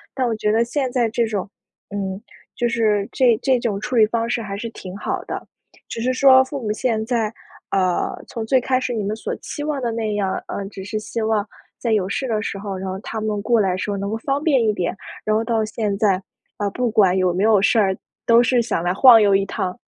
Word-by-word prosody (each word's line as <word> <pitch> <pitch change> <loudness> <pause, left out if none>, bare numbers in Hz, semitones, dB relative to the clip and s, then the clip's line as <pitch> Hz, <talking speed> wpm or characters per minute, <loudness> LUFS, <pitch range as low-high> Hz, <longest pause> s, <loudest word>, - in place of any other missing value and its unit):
那 260 -2 0
我 235 - 0
觉 210 0 +1
得 230 +1 +3
现 260 +2 -1
在 240 -3 +1
这 230 0 0
种 200 -2 -3 0.4
嗯， 195 0 -3 0.3
就 240 -1 0
是 215 -3 +1
这 245 -4 +3
这 260 -2 +3
种 210 -4 -2
处 250 - -5
理 215 - +7
方 230 +1 -1
式 240 - 0
还 200 -2 -5
是 230 +2 -5
挺 185 -4 -9
好 - - -3
的。 - - -5 0.4
只 230 - -5
是 255 +2 +1
说 260 0 +7
父 275 0 -6
母 210 -2 -2
现 220 -2 -1
在， 230 -3 -1 0.4
啊， 185 -2 +1
从 225 -2 -5
最 260 +3 +3
开 255 +1 +1
始 250 -2 -2
你 215 -3 -2
们 210 +2 -2
所 220 - -4
期 290 - -6
望 295 -3 -2
的 235 -2 -1
那 220 -2 -2
样， 195 -2 0
呃， 200 - -4
只 190 -2 -9
是 215 +2 -4
希 225 +2 -4
望 220 -1 0 0.3
在 235 - -1
有 190 -3 +1
事 265 +5 -2
的 215 -2 0
时 200 - -4
候， 195 -1 -5
然 190 0 -4
后 190 +1 -4
他 220 +1 -5
们 210 -1 -2
过 235 +1 +2
来 185 -2 +1
时 205 - -3
候 - - -1
能 200 +1 -3
够 220 - -2
方 275 +5 -2
便 265 -8 +3
一 210 - +2
点， 180 -1 -2 0.3
然 215 0 +1
后 225 - +1
到 225 -1 0
现 210 -2 -2
在， 195 -3 +2 0.4
啊 205 -1 -1
不 250 +1 -1
管 190 -4 +4
有 185 -2 +2
没 190 +3 0
有 215 -3 +5
事 225 +2 +3
儿， 190 -2 +2 0.3
都 235 0 +6
是 240 0 +3
想 215 -7 -2
来 175 +1 +1
晃 230 +1 +8
悠 200 -1 +4
一 195 0 +2
趟。 190 -3 -3
220 Hz, 270 characters per minute, -21 LUFS, 200-235 Hz, 0.4 s, 晃